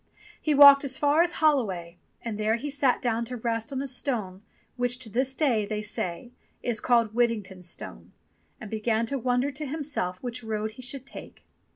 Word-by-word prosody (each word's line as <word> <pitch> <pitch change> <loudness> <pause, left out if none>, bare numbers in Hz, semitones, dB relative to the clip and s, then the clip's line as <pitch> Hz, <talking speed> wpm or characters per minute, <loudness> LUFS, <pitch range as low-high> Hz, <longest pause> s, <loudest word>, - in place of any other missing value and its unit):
He 305 -2 +1
walked 280 0 +9
as 265 -2 +1
far 295 +2 +3
as 345 0 +1
Holloway, 195 - 0 0.2
and 220 -3 -4
there 215 +1 +2
he 285 +5 -4
sat 275 -3 +1
down 235 -1 0
to 250 +2 -5
rest 230 0 -2
on 270 0 -2
a - - -4
stone, 230 -8 -3 0.3
which 245 0 -1
to 250 -3 -8
this 260 +5 -1
day, 255 -9 +2
they 210 +1 -3
say, 210 +2 -5 0.3
is 235 -3 -1
called 235 -3 +3
"Whitting 230 -2 +2
ton's 185 -2 -7
Stone," - - -8 0.5
and 215 - -9
began 220 +1 0
to 275 +4 -3
wonder 250 +3 +1
to 300 +3 -5
himself 285 - -2
which 245 -1 -4
road 215 -1 -3
he 225 - -12
should 265 +1 -6
take. - - -11
240 Hz, 195 wpm, -27 LUFS, 215-270 Hz, 0.5 s, walked